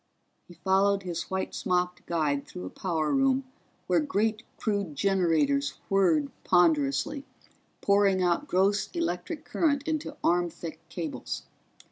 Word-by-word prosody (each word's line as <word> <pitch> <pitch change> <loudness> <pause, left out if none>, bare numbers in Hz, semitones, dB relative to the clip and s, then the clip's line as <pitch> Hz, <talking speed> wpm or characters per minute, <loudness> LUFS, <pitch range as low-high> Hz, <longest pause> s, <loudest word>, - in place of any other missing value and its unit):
He 175 - -14
followed 195 +3 +2
his 175 -2 -4
white 190 0 -2
smocked 180 -1 -1
guide 150 -4 0
through 90 - -7
a 90 - -7
power 160 -5 -1
room 270 0 +3 0.4
where - - +3
great 220 -7 0 0.2
crude 200 -8 -1
generators 150 -6 +2
whirred 170 -7 +3
ponderously, 160 - +2 0.6
pouring 200 -2 +3
out 180 +12 +1
gross 195 0 +2
electric 315 - -3
current 285 -4 +1
into 310 -2 -2
arm 175 0 +3
thick 165 0 -8
cables. 165 -4 -5
185 Hz, 125 wpm, -28 LUFS, 165-205 Hz, 0.6 s, room